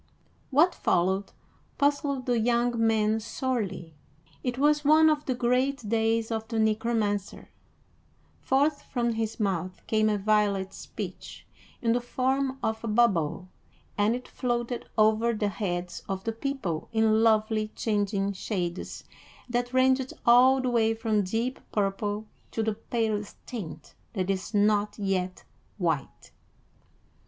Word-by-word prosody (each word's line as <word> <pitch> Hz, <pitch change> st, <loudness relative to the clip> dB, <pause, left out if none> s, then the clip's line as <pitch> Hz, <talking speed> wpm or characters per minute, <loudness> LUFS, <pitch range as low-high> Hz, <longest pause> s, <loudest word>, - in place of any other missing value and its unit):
What 315 Hz, +7 st, +4 dB
followed 190 Hz, +3 st, +1 dB, 0.5 s
puzzled 285 Hz, -2 st, +1 dB
the 245 Hz, -2 st, +1 dB
young 240 Hz, +1 st, +2 dB
man 220 Hz, 0 st, +2 dB
sorely. 210 Hz, -8 st, -3 dB, 0.5 s
It 250 Hz, -1 st, -2 dB
was 295 Hz, +2 st, +3 dB
one 310 Hz, +2 st, +6 dB
of 300 Hz, -1 st, -1 dB
the 255 Hz, -, 0 dB
great 250 Hz, 0 st, 0 dB
days 225 Hz, +1 st, +1 dB
of 220 Hz, 0 st, -2 dB
the 230 Hz, -1 st, -3 dB
Necromancer: 220 Hz, -2 st, 0 dB, 0.9 s
forth 285 Hz, +2 st, +1 dB
from 240 Hz, -2 st, -1 dB
his 225 Hz, 0 st, -3 dB
mouth 185 Hz, -3 st, -2 dB
came 215 Hz, -1 st, +2 dB
a 210 Hz, -, +1 dB
violet 200 Hz, -2 st, +1 dB
speech -, -, -8 dB, 0.4 s
in 230 Hz, -1 st, +3 dB
the 245 Hz, -, +1 dB
form 265 Hz, +2 st, 0 dB
of 220 Hz, +1 st, -1 dB
a -, -, -3 dB
bubble, 195 Hz, -6 st, +1 dB, 0.5 s
and 210 Hz, +3 st, +2 dB
it 250 Hz, -, -7 dB
floated 240 Hz, -1 st, -2 dB
over 220 Hz, +2 st, +3 dB
the 210 Hz, -1 st, 0 dB
heads 180 Hz, -3 st, -3 dB
of 190 Hz, -1 st, -3 dB
the 225 Hz, -, -1 dB
people 225 Hz, -, -3 dB
in 220 Hz, -1 st, +3 dB
lovely 215 Hz, -1 st, +2 dB
changing 200 Hz, -2 st, 0 dB
shades 185 Hz, -3 st, -4 dB, 0.4 s
that 245 Hz, 0 st, -1 dB
ranged 260 Hz, 0 st, +2 dB
all 255 Hz, +3 st, +6 dB
the 255 Hz, -, 0 dB
way 225 Hz, -1 st, +2 dB
from 220 Hz, -2 st, +1 dB
deep 225 Hz, +7 st, -2 dB
purple 205 Hz, +1 st, -1 dB, 0.2 s
to 225 Hz, -, -2 dB
the 220 Hz, 0 st, 0 dB
palest 215 Hz, -2 st, -2 dB
tint 215 Hz, -10 st, -7 dB, 0.2 s
that 190 Hz, -3 st, 0 dB
is 190 Hz, 0 st, -3 dB
not 210 Hz, 0 st, +2 dB
yet 190 Hz, -3 st, -2 dB, 0.3 s
white. 165 Hz, -8 st, -2 dB
220 Hz, 135 wpm, -27 LUFS, 205-245 Hz, 0.9 s, one